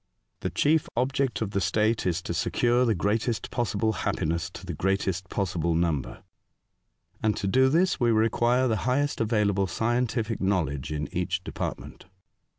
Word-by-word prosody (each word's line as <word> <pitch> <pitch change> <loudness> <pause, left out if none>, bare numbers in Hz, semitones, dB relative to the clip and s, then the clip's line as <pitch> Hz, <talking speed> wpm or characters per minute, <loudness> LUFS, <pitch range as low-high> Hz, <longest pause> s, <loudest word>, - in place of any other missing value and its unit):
The - - -2
chief 155 +1 +2
object 130 -1 0
of 100 - -4
the 100 - 0
state 110 0 +1
is 90 0 -1
to - - -3
secure 120 +8 +2
the 115 -3 +2
greatest 105 +4 -1
possible 110 -2 0
happiness 85 -3 -2
to - - -10
the - - -4
greatest 95 -1 -1
possible 85 -4 -1
number, 80 -5 -1 1.0
and 110 -1 +1
to 100 - -3
do 130 +7 +4
this 175 +6 +2
we 120 - +3
require 120 +3 +2
the 110 -2 +1
highest 145 +1 0
available 105 -3 +1
scientific 115 +2 -1
knowledge 80 -8 0
in 75 -1 -2
each 90 0 -1
department." - - -6
105 Hz, 155 wpm, -27 LUFS, 90-120 Hz, 1.0 s, do